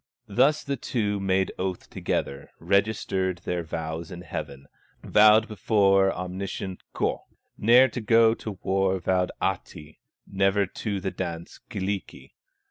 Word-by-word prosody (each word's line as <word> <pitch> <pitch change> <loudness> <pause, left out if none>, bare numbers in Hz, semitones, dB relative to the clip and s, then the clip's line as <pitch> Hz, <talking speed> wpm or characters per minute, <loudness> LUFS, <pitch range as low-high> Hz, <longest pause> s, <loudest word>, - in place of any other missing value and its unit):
Thus 140 +9 +3
the 140 -1 -3
two 105 -4 -1
made 95 -1 +1
oath 95 -1 -3
together, 70 0 -3
Registered 100 -2 0
their 90 -1 -1
vows 80 +1 -5
in 90 -2 -8
heaven, 70 -5 -7 0.4
Vowed 110 +1 +5
before 95 -2 +3
omniscient 95 +1 -5
Ukko, - - -1 0.3
Ne'er 120 +5 +6
to 125 - -5
go 115 +1 +5
to 110 -3 -7
war 95 0 +1
vowed 90 +1 0
Ahti, 75 +1 -4 0.3
Never 95 +1 +1
to 100 +2 -4
the 95 0 -3
dance, 85 -2 -6
Kyllikki. 100 0 -5
95 Hz, 125 wpm, -26 LUFS, 90-105 Hz, 0.4 s, Ne'er